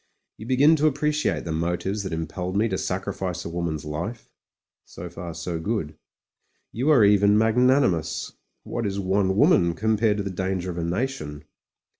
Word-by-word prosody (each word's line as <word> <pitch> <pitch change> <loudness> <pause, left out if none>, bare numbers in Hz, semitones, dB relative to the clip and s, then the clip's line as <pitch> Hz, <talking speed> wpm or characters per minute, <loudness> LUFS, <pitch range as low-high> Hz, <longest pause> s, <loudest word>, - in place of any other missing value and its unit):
You 110 - -9
begin 140 +5 +5
to 155 +1 +4
appre 150 +1 -1
ciate 150 0 -1
the 85 - -4
motives 90 +5 -1
that 95 - -5
impelled 90 +4 -3
me 110 +2 +3
to 95 - -1
sacrifice 95 -1 -3
a - - -4
wom 85 0 -2
an's 80 -2 -4
life; 85 +10 -5 0.5
so 85 0 -9
far 85 -1 -7
so 85 0 -4
good. 80 -4 -3 0.8
You 130 +7 -1
are 130 -9 +6
even 100 0 +5
mag 110 +1 +3
nanimous: 125 - +2 0.3
what 115 -3 -3
is 100 0 -3
one 95 0 +1
woman 95 - +4
compared 110 +2 +1
to 100 - -2
the 100 - -4
dan 95 +1 -2
ger 90 +1 -4
of 85 - -5
a - - -2
nation? 85 - -3
95 Hz, 185 wpm, -24 LUFS, 85-110 Hz, 0.8 s, are